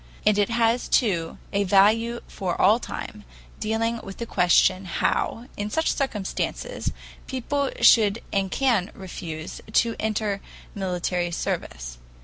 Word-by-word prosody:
And 210 - +5
it 205 - +2
has, 235 +1 +2
too, 175 -9 +1 0.2
a 200 0 +2
value 215 +5 +3
for 185 -4 -3
all 210 +5 +5
time, 210 -3 -7 0.4
dealing 225 +2 0
with 195 - -8
the 235 - -4
question 185 -1 +3
how, 225 +6 -1
in 205 +1 -2
such 320 +9 +1
circumstances, 265 - -3 0.4
people 275 +1 -1
should 215 -1 +5
and 195 -1 +1
can 230 -6 +1
refuse 170 -4 -7
to 230 0 +3
enter 215 -2 -1 0.3
military 180 -2 -1
service. - - -4
205 Hz, 130 wpm, -25 LUFS, 185-230 Hz, 0.4 s, And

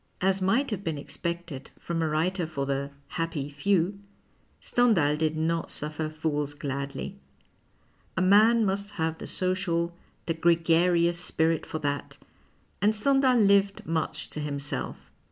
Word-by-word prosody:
As 190 +1 +1
might 230 +9 +2
have 200 -2 -3
been 160 -5 -2
expected 170 -1 -5
from 170 -1 -3
a 160 - +1
wTiter 165 +3 0
for 140 -4 -2
the 140 0 -2
" 140 - -33
happy 160 -4 -2
few," 190 +5 +1 0.6
Stendhal 195 -12 +3
did 155 0 0
not 165 +1 0
suffer 155 +1 -1
fools 150 -2 -2
gladly. 140 +6 -5 1.0
A - - +2
man 215 +4 +6
must 200 +1 -1
have 160 -1 -1
the - - -6
social, 175 -2 0 0.3
tiic 165 -1 -3
gregarious 170 0 +3
spirit 165 -2 0
for - - -3
that, 145 -2 -3 0.6
and 210 +2 +3
Stendhal 265 +2 +3
lived 200 -2 +3
much 160 0 -2
to - - -5
himself. 145 -1 -4
165 Hz, 140 wpm, -27 LUFS, 150-195 Hz, 1.0 s, man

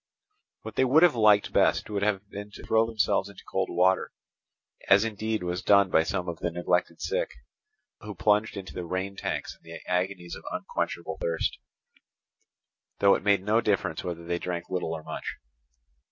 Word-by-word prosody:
What - - -8
they - - +4
would 140 +6 +5
have 175 - +6
liked 105 -3 +4
best - - +3
would 105 -2 -2
have 100 -1 0
been 100 +1 -8
to - - -10
throw 110 0 +3
themselves 100 -3 +1
into 100 -2 -13
cold 95 0 -1
water; 95 +2 +2 0.8
as 100 +3 +6
indeed 110 -2 -2
was 90 +1 -2
done 100 -2 +4
by - - +5
some 90 +2 -2
of 85 -2 -4
the 85 - -1
neglected 90 +1 -1
sick, - - -1 0.7
who 105 -2 -8
plunged 105 +2 +2
into 95 -2 -7
the 90 - -5
rain 95 +3 -3
tanks - - -4
in - - -30
their 80 0 -10
agonies 90 -1 -2
of - - -8
unquenchable - - -3
thirst; 85 -1 -1 1.4
though 100 -1 +5
it - - 0
made 100 -2 +3
no 110 +3 +3
difference 100 -7 0
whether 85 -2 -5
they 85 0 -1
drank 85 0 -4
little 90 -3 -1
or 80 -1 -6
much. - - -5
100 Hz, 180 wpm, -27 LUFS, 90-105 Hz, 1.4 s, have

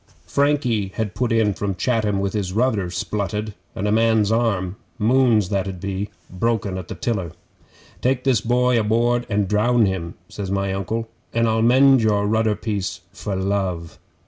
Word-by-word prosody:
Frankie 140 -8 +1
had 105 -3 -2
put 125 -2 -1
in 110 -3 +3
from 100 0 -3
Chatham 110 -2 0
with 100 0 -1
his 100 -4 -2
rudder 110 -5 +1
splutted, 105 +3 -3 0.2
and 100 - -2
a - - +1
man's 110 -1 +3
arm 100 -5 0 0.2
Moon's 115 -3 +3
that 100 -2 0
'ud 95 -2 -5
be 100 +2 -3 0.2
broken 100 0 -1
at 90 - -8
the - - -6
tiller. 95 -9 -2 0.7
"Take 125 0 +1
this 130 -6 +2
boy 125 0 +2
aboard 120 +3 +1
an' 105 -1 +1
drown 110 +4 +3
him," 90 -3 -3
says 100 +1 -6
my 100 0 -1
Uncle, 110 +4 -3 0.3
"and 115 0 +3
I'll 110 0 +1
mend 130 +2 +5
your 105 -2 +2
rudder 110 0 +2
piece 100 -5 -3
for 100 +1 -4
love." 95 -3 -2
105 Hz, 170 wpm, -22 LUFS, 95-115 Hz, 0.7 s, mend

